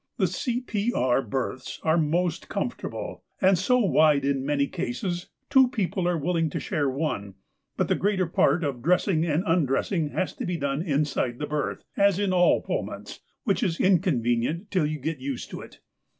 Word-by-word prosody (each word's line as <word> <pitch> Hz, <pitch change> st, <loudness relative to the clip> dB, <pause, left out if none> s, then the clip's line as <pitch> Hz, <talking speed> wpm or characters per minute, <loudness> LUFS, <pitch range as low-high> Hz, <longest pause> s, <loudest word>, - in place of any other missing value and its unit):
The -, -, +3 dB
C.P.R. 225 Hz, -, 0 dB
berths 130 Hz, +2 st, -4 dB
are 160 Hz, 0 st, +3 dB
most 165 Hz, +1 st, 0 dB
comfortable, 245 Hz, -, -4 dB, 0.2 s
and 190 Hz, 0 st, +5 dB
so 190 Hz, +8 st, +2 dB
wide 155 Hz, -, +4 dB
that 140 Hz, -, +1 dB
in 135 Hz, -1 st, -2 dB
many 140 Hz, 0 st, +1 dB
cases 185 Hz, -, -3 dB, 0.2 s
two 265 Hz, -2 st, +7 dB
people 190 Hz, -6 st, -1 dB
are 175 Hz, -1 st, +1 dB
willing 165 Hz, +1 st, 0 dB
to -, -, -3 dB
share 150 Hz, -7 st, -1 dB
one, 130 Hz, -9 st, -3 dB, 0.4 s
but -, -, +1 dB
the -, -, +2 dB
greater 195 Hz, -2 st, +1 dB
part 170 Hz, 0 st, +2 dB
of 135 Hz, -5 st, -2 dB
dressing 175 Hz, -, +2 dB
and 155 Hz, +3 st, +1 dB
undressing 165 Hz, 0 st, +1 dB
has 185 Hz, +4 st, -2 dB
to -, -, -3 dB
be 175 Hz, -1 st, -1 dB
done 140 Hz, 0 st, -1 dB
inside 145 Hz, -6 st, 0 dB
the 150 Hz, -, -3 dB
berth, 150 Hz, 0 st, -3 dB
as 200 Hz, -2 st, +4 dB
in 200 Hz, -2 st, +1 dB
all 180 Hz, -1 st, +4 dB
Pullmans, -, -, -4 dB, 0.2 s
which -, -, +1 dB
is 175 Hz, -7 st, 0 dB
inconvenient 165 Hz, -, +1 dB
till 180 Hz, -6 st, +2 dB
you 155 Hz, 0 st, -3 dB
get 155 Hz, +1 st, -3 dB
used 130 Hz, -1 st, -5 dB
to -, -, -6 dB
it. -, -, -14 dB
165 Hz, 180 wpm, -26 LUFS, 140-185 Hz, 0.4 s, two